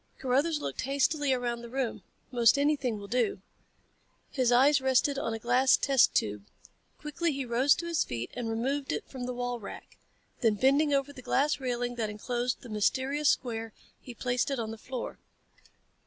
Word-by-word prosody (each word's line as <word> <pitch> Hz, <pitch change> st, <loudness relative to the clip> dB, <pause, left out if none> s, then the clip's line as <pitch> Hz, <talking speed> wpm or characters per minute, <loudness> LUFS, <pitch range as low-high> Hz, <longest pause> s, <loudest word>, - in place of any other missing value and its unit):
Carruthers 280 Hz, +5 st, +1 dB
looked -, -, -4 dB
hastily 280 Hz, +1 st, +1 dB
around 240 Hz, -2 st, -1 dB
the 235 Hz, -, -9 dB
room. 255 Hz, -2 st, -2 dB, 0.3 s
"Most 240 Hz, +1 st, +4 dB
anything 280 Hz, -5 st, +1 dB
will 200 Hz, -1 st, -9 dB
do." 250 Hz, -, 0 dB, 0.9 s
His 255 Hz, -3 st, +1 dB
eyes 270 Hz, +3 st, +5 dB
rested 265 Hz, +2 st, +2 dB
on 230 Hz, -, -2 dB
a 225 Hz, -, -2 dB
glass 245 Hz, +3 st, +4 dB
test 270 Hz, -3 st, +3 dB
tube. 105 Hz, -1 st, 0 dB, 0.5 s
Quickly 310 Hz, +3 st, -2 dB
he 275 Hz, -2 st, -3 dB
rose 250 Hz, +4 st, +3 dB
to 340 Hz, -, -5 dB
his 335 Hz, -2 st, +1 dB
feet 120 Hz, 0 st, -5 dB
and 240 Hz, -2 st, -4 dB
removed 265 Hz, +5 st, -1 dB
it -, -, -4 dB
from 255 Hz, -2 st, -6 dB
the 250 Hz, -, -3 dB
wall 245 Hz, 0 st, -3 dB
rack. 200 Hz, -, -10 dB, 0.4 s
Then 225 Hz, -3 st, +2 dB
bending 280 Hz, +6 st, +3 dB
over 280 Hz, 0 st, 0 dB
the 255 Hz, -, -11 dB
glass 285 Hz, +4 st, +1 dB
railing 245 Hz, -2 st, -2 dB
that 220 Hz, -2 st, -1 dB
enclosed 240 Hz, +3 st, -2 dB
the -, -, -9 dB
mysterious 265 Hz, +7 st, +1 dB
square 225 Hz, -3 st, -1 dB, 0.3 s
he 245 Hz, -, -10 dB
placed 245 Hz, +2 st, -1 dB
it 275 Hz, -, -1 dB
on 225 Hz, -2 st, -3 dB
the 225 Hz, -, -8 dB
floor. 255 Hz, +1 st, -6 dB
250 Hz, 180 wpm, -29 LUFS, 235-275 Hz, 0.9 s, eyes